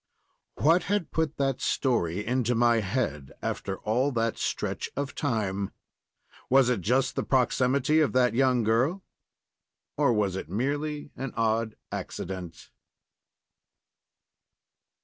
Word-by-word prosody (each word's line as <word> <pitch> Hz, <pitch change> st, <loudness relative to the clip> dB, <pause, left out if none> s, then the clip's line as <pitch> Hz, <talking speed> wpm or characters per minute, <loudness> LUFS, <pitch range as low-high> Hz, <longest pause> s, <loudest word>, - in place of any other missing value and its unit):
What 165 Hz, +5 st, +3 dB
had 205 Hz, -3 st, -1 dB
put 160 Hz, -2 st, -1 dB
that 135 Hz, -2 st, 0 dB
story 105 Hz, -, 0 dB
into 125 Hz, 0 st, +1 dB
my 120 Hz, 0 st, +4 dB
head 95 Hz, -, -2 dB
after 95 Hz, -1 st, -3 dB
all 125 Hz, +6 st, +1 dB
that 115 Hz, -1 st, 0 dB
stretch -, -, -2 dB
of 140 Hz, 0 st, -3 dB
time? 100 Hz, -8 st, -1 dB, 0.8 s
Was 130 Hz, -1 st, +5 dB
it 120 Hz, -6 st, 0 dB
just 130 Hz, +7 st, +1 dB
the -, -, 0 dB
proximity 130 Hz, +3 st, +2 dB
of 155 Hz, -, +3 dB
that 125 Hz, -1 st, +3 dB
young 125 Hz, -1 st, +3 dB
girl, 130 Hz, -, +1 dB, 0.9 s
or -, -, +3 dB
was 105 Hz, -4 st, +1 dB
it 95 Hz, -, -5 dB
merely 145 Hz, -, -2 dB
an 135 Hz, -2 st, -5 dB
odd 110 Hz, 0 st, 0 dB, 0.2 s
accident? 90 Hz, -3 st, -6 dB
125 Hz, 120 wpm, -27 LUFS, 105-135 Hz, 0.9 s, Was